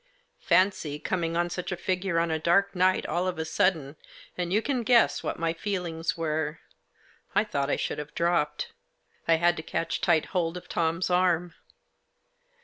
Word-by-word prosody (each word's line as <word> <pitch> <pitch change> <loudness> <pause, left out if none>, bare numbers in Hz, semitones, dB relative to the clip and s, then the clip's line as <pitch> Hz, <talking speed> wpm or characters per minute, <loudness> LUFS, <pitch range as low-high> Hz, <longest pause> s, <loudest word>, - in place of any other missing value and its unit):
Fancy 185 -6 +2
coming 165 +1 -2
on 175 0 0
such 180 +1 -4
a 185 - -2
figure, 185 0 -1
on 165 0 +1
a 160 - 0
dark 175 +5 +3
night, 185 +1 +2
all 180 +2 -1
of 185 - -2
a 160 - -2
sudden, 160 -4 0 0.4
and 175 -1 -3
you 205 - +4
can 255 +2 -1
guess 235 +1 +4
what - - -3
my 165 -1 0
feelings 170 -4 -3
were. 160 -1 -2 0.8
I 210 - +5
thought 140 -10 -2
I - - +2
should - - -3
have 150 0 -8
dropped. 170 -3 0 0.6
I 165 - +5
had 175 +1 +3
to - - -3
catch 165 +1 -3
tight 165 -4 +3
hold 175 -2 0
of 180 - -10
Tom's 170 +2 0
arm. 180 -1 +2
170 Hz, 175 wpm, -27 LUFS, 160-185 Hz, 0.8 s, I